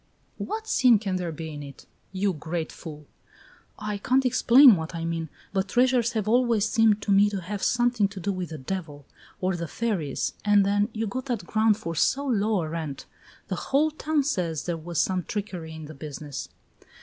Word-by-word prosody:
"What 440 +1 -4
sin 250 - +5
can 195 -3 -2
there 175 -2 -3
be 160 0 -6
in 145 - -7
it, 140 -1 -11 0.3
you 195 0 0
great 160 +1 -4
fool?" 150 -2 -10 0.7
"I 210 -1 -4
can't 260 +5 +2
explain 255 0 +7
what 160 0 -5
I 165 0 -3
mean, 165 -1 -3 0.2
but 190 0 0
treasures 245 +2 +2
have 215 -3 -1
always 230 -2 +3
seemed 220 -2 +3
to 205 - -1
me 200 +1 +5
to 200 -2 -3
have 195 +3 -5
something 240 -4 +2
to 200 -1 -9
do 200 +3 -1
with 185 -2 -4
the 160 - -6
devil, 145 -1 -6 0.4
or 185 0 0
the 170 -1 -4
fairies. 180 - -2
And 205 -1 +4
then, 205 +2 +2
you 220 +1 -2
got 250 +5 -4
that 235 -8 -2
ground 215 +1 +2
for 170 -6 -5
so 275 - +1
low 215 -6 +1
a 155 - -4
rent! 155 -4 -5 0.4
The 190 - -2
whole 300 +3 +3
town 305 -1 0
says 175 - -1
there 175 - -2
was 165 +1 -4
some 185 -1 +1
trickery 180 -6 -5
in 160 -1 -8
the 155 - -9
business!" 145 -1 -7
195 Hz, 195 wpm, -26 LUFS, 165-225 Hz, 0.7 s, explain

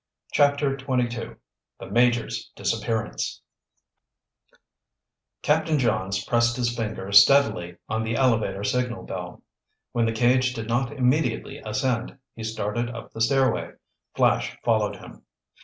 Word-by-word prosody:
CHAPTER 145 -1 +3
XXII 125 -3 -2 0.4
THE - - -8
MAJOR'S 120 -1 +1
DISAPPEARANCE 110 -1 -2 2.0
Captain 155 +1 +2
Johns 100 -6 0
pressed 120 0 +2
his 120 -1 0
finger 105 -4 -4
steadily 100 -6 +5
on 110 0 -1
the 110 +1 -2
elevator 110 -7 +1
signal 120 +3 -1
bell. 90 -1 -7 0.5
When 115 -1 +1
the - - +1
cage 125 +2 +2
did 115 -1 -5
not 120 +3 0
immediately 130 -2 0
ascend, 115 +3 -2 0.2
he 115 - -8
started 110 +2 -2
up 120 - -9
the 115 - -6
stairway. 130 +1 +2 0.4
Flash - - +1
followed - - +1
him. - - -13
120 Hz, 120 wpm, -25 LUFS, 110-130 Hz, 2.0 s, steadily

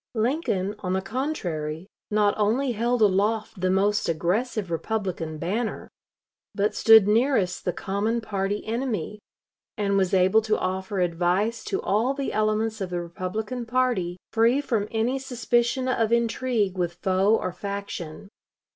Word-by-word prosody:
Lincoln, 220 - 0
on 185 -1 -2
the 190 - 0
contrary, 180 - -3 0.2
not 210 -1 +3
only 235 +6 +1
held 235 +1 +1
aloft 210 +1 +1
the 185 - +2
most 200 +1 +2
aggressive 190 - -1
Republican 170 -4 -3
banner, 210 +8 -3 0.6
but 205 +1 +1
stood 220 -3 +7
nearest 220 -4 +2
the 180 - +1
common 200 +6 -1
party 205 -2 -2
enemy, 220 -4 -3 0.6
and 200 -2 +1
was 190 -2 +2
able 190 +4 +4
to 215 0 0
offer 190 +1 -2
advice 180 +6 0
to 390 - -1
all 230 +7 +1
the 275 -1 -3
elements 215 0 0
of 190 - -2
the 175 -1 -2
Republican 210 +8 -4
party, 235 -8 0 0.2
free 230 +4 +4
from 225 -7 -1
any 235 +4 0
suspicion 250 0 0
of 230 -3 +1
intrigue 235 -4 0
with 175 -1 -1
foe 195 +2 +3
or 185 - -2
faction. 200 -3 -6
210 Hz, 140 wpm, -25 LUFS, 185-230 Hz, 0.6 s, stood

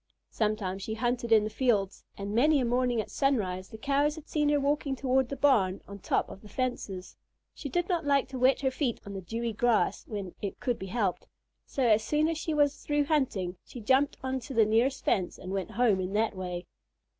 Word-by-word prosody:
Sometimes 210 -3 -1
she 220 +3 -4
hunted 240 0 -1
in 220 -2 +6
the 215 - -2
fields, 210 -5 0
and 200 +1 -4
many 290 +6 +4
a 255 - +1
morning 245 0 +1
at 215 - -4
sunrise 195 -10 0
the 220 - -9
Cows 285 +4 +1
had 315 -1 -11
seen 295 -1 +1
her 295 0 +3
walking 280 -1 0
toward 260 -1 +1
the 280 - -3
barn 220 -10 +3
on 200 - -8
the - - -20
top - - 0
of 195 - -11
the 210 - -13
fences. 205 -6 -4 0.4
She 285 - -6
did 350 +6 0
not 345 -3 0
like 280 -2 +2
to 260 -1 -5
wet 260 +2 +4
her 265 -1 +1
feet 260 -3 -1
on 200 - -7
the 195 - -5
dewy 230 +5 -3
grass 235 +1 +1
when 200 -4 -5
it 200 - -4
could 245 -2 -1
be 190 - -6
helped; 200 -3 -1 0.4
so, 270 - -2
as 220 -2 +4
soon 300 +6 +2
as 325 -1 -1
she 320 - -3
was 290 -2 +2
through 290 0 0
hunting, 215 - 0
she 245 - -10
jumped 265 +6 +2
on 260 0 -1
to 260 +2 -8
the 225 -1 +5
nearest 235 +5 +1
fence 185 -3 +1
and 185 - -7
went 195 +1 -2
home 225 -3 +2
in 185 +1 -4
that 220 0 +1
way. 180 -1 -5
240 Hz, 225 wpm, -29 LUFS, 205-275 Hz, 0.4 s, in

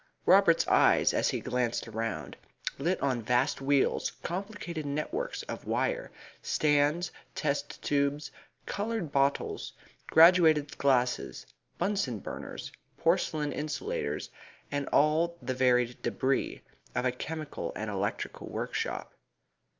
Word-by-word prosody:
Robert's - - +5
eyes, - - +5
as - - +2
he - - -1
glanced 125 -2 -1
around, 110 -8 -4 0.4
lit 175 +6 0
on 130 -4 +1
vast 125 +6 +1
wheels, 140 0 +2
complicated 180 -3 -4
networks 155 - -3
of - - -7
wire, - - 0 0.3
stands, 150 +3 +2 0.2
test 145 -2 -2
tubes, 145 +1 0 0.3
coloured 205 -6 -3
bottles, 140 0 0 0.3
graduated 160 -3 +6
glasses, 125 -3 +1 0.3
Bunsen 180 - 0
burners, - - -7 0.3
porcelain 150 -2 +1
insulators, 430 - -3 0.4
and 145 -1 -2
all 160 +3 +3
the 130 0 -3
varied 125 -1 +2
debris 135 +1 -1 0.3
of 125 0 0
a 125 - +3
chemical 155 +4 -5
and 110 -1 -3
electrical 100 0 -3
workshop. - - -3
145 Hz, 110 wpm, -30 LUFS, 125-170 Hz, 0.4 s, graduated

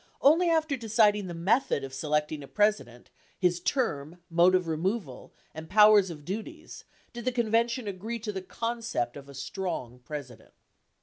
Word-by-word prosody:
Only 330 +5 +5
after 320 -3 +1
deciding 215 -4 +2
the 175 - -6
method 190 - +1
of 135 -1 -7
selecting 150 +1 -1
a 140 - -10
President, 205 - 0 0.3
his 175 -2 +1
term, 175 - -1
mode 175 +2 +5
of 180 -2 +1
removal, 165 - -3 0.2
and 160 0 -9
powers 210 -1 +6
and 150 -4 -9
duties 205 +4 -7 0.3
did 240 0 -7
the 255 - 0
convention 235 0 0
agree 205 +4 -4
to 215 -1 -3
the 190 -2 -5
concept 230 - -3
of 140 -1 -11
a 140 - -11
strong 130 -3 -5
President. 125 -2 -9
185 Hz, 160 wpm, -28 LUFS, 150-230 Hz, 0.3 s, powers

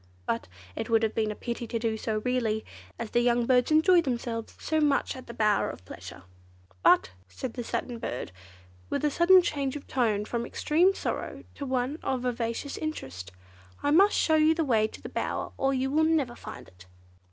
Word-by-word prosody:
But 115 -3 -2 0.3
it 225 - -4
would 225 0 +3
have 220 - +1
been 215 -1 0
a 210 - -4
pity 235 +1 -4
to 230 - -2
do 225 -1 -1
so, 215 -1 -2
really, 230 -4 0 0.3
as 230 -2 -5
the 240 - +3
young 240 0 +2
birds 250 0 +3
enjoy 340 +3 +5
themselves 235 -5 -3
so 315 0 0
much 290 -2 +2
at 260 - -10
the 235 - -7
'Bower 215 -3 +2
of 90 - -9
Pleasure'. 90 - -10 0.6
But," - - +5 0.2
said 255 -3 -6
the 245 - -4
Satin 235 +1 -3
Bird, 125 - -4 0.6
with - - -1
a 295 - +2
sudden 360 +4 +6
change 280 -4 -1
of 290 - -7
tone 220 -5 0
from 235 +1 -2
extreme 340 +10 +2
sorrow - - -4
to 280 - -6
one 260 +4 -1
of 260 -2 -1
vivacious 240 +2 -2
interest, 95 - -5 0.5
"I 290 - +2
must 390 +7 +6
show 315 -1 +3
you 310 +1 +4
the 325 -1 0
way 220 -5 +3
to - - -12
the - - -5
bower, - - -3
or 270 - +1
you 265 0 0
would 315 +2 +3
never 295 -7 +1
find - - -10
it." 90 0 -18
250 Hz, 200 wpm, -28 LUFS, 225-295 Hz, 0.6 s, sudden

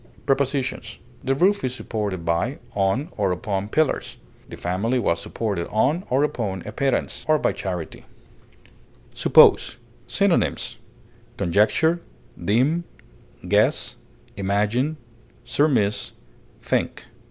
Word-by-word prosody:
Prepositions: 135 -4 -1 0.3
The 135 0 +1
roof 195 +7 +3
is 130 -1 -1
supported 100 -8 -4
by, 85 - 0 0.2
on, 100 +9 0
or 100 -3 +1
upon 95 +2 -2
pillars; 155 +3 0 0.3
the - - -8
family 100 +8 -1
was 85 -8 0
supported 100 -6 -3
on 145 - +1
or 130 +3 +3
upon 110 -11 -2
a 105 - -5
pittance, 135 +4 -1
or 155 0 +4
by - - +1
charity. 90 -4 -5 1.1
SUPPOSE. - - +5 0.3
Synonyms: - - +1 0.6
conjecture, 135 - +2 0.4
deem, 130 - +2 0.6
guess, 105 +3 +2 0.4
imagine, 105 +10 0 0.5
surmise, 125 -9 +1 0.5
think. - - -1
110 Hz, 105 wpm, -23 LUFS, 100-140 Hz, 1.1 s, SUPPOSE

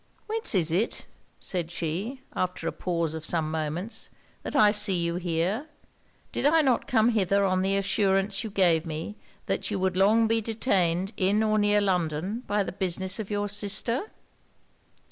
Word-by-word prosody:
'Whence 445 - -1
is 165 -4 +3
it,' 195 +8 -1 0.3
said 175 -3 -3
she, 180 - -4
after 180 -2 -2
a - - 0
pause 170 -3 -2
of 160 -1 -6
some 155 -1 0
moments, 160 +7 -4 0.3
that - - -6
I 210 -6 +6
see 205 -3 +3
you 170 0 -1
here? 180 - -1 0.6
Did - - +1
I 320 +2 +5
not 260 -4 +1
come 225 -1 +3
hither 200 -3 +2
on 185 -1 +1
the 195 +1 +1
assurance 195 0 +1
you 220 - -4
gave 175 -5 +3
me 165 +5 -5 0.3
that - - -1
you 210 - -2
would 185 -1 0
long 215 +4 +4
be 225 0 +1
detained 195 -4 0
in 200 +3 +2
or 215 0 +2
near 205 0 +3
London 180 +1 -1
by 205 0 +1
the - - -5
business 190 +1 0
of 215 - -5
your 205 0 -1
sister?' 205 - 0
195 Hz, 170 wpm, -27 LUFS, 175-215 Hz, 0.6 s, I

